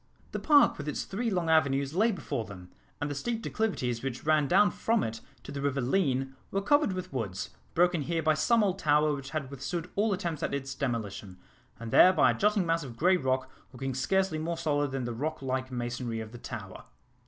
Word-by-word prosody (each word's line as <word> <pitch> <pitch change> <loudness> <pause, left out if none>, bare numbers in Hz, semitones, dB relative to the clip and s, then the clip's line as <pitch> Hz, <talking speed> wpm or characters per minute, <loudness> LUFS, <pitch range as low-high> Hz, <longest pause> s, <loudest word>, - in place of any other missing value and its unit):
The - - -3
park 290 - +5
with 150 - -5
its 150 - -2
three 230 +5 -2
long 180 -5 -1
avenues 140 -3 +2
lay 220 +6 +3
before 190 - -3
them, 90 -4 -11 0.3
and 145 - -1
the 145 - -3
steep 225 +10 -3
declivities 125 - -1
which 135 0 -5
ran 155 -2 +3
down 205 +9 +5
from 230 -1 +1
it 115 0 -4 0.2
to - - -8
the 140 - -4
river 140 -1 0
Leen 135 -1 +1 0.2
were 195 - 0
covered 290 -1 +3
with 185 -5 -6
woods, 100 -6 -3 0.2
broken 175 -1 +3
here 165 +2 -1
by 155 0 +4
some 220 +9 +3
old 195 -1 0
tower 150 -2 +3
which 140 -1 -6
had 140 -2 -4
withstood 150 +6 -4
all 210 +2 +2
attempts 170 -6 -2
at - - -1
its 135 -1 -4
demolition, 105 -8 -4 0.4
and 115 -1 -6
there 185 - +7
by - - +5
a - - -3
jutting 210 -2 +2
mass 165 -1 +1
of 120 -4 -9
grey 185 +3 +4
rock, 130 -4 0 0.3
looking 135 +1 -4
scarcely 180 +5 +1
more 165 +2 -2
solid 145 -2 0
than 135 -1 -3
the 120 - -3
rock 155 +7 -3
like 130 0 -2
masonry 120 -1 -3
of 110 -1 -7
the 120 - -10
tower. - - -8
145 Hz, 215 wpm, -29 LUFS, 130-180 Hz, 0.4 s, there